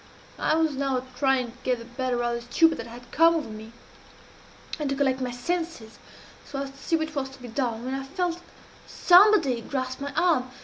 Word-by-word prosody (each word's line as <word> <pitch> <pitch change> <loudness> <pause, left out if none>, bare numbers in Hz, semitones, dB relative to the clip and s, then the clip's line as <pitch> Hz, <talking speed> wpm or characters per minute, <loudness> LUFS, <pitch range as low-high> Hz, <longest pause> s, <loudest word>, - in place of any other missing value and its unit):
I 310 - +2
was 320 -1 +2
now 265 -2 -1
trying 255 -2 +1
to 245 - -20
get 255 -1 0
the 230 - -10
better 245 0 -2
of 240 0 0
the 235 - -3
stupor 325 +3 +5
that - - -6
had 240 +1 -12
come 330 +1 +5
over 310 -7 -2
me, 215 +1 -9 1.1
and 295 -2 -1
to 275 - 0
collect 265 -1 +1
my 255 - -1
senses 290 -2 -4 0.4
so 275 -1 -5
as 275 - -7
to 275 - -19
see 330 - 0
what 315 -1 -2
was 275 -3 -2
to 265 - -14
be 250 - -9
done, 235 -1 -2
when 260 - -3
I 270 0 -3
felt 355 +4 -2 0.5
somebody 350 - +5
grasp 255 +1 -4
my 280 0 -4
arm. 315 -7 +2
270 Hz, 210 wpm, -26 LUFS, 245-315 Hz, 1.1 s, stupor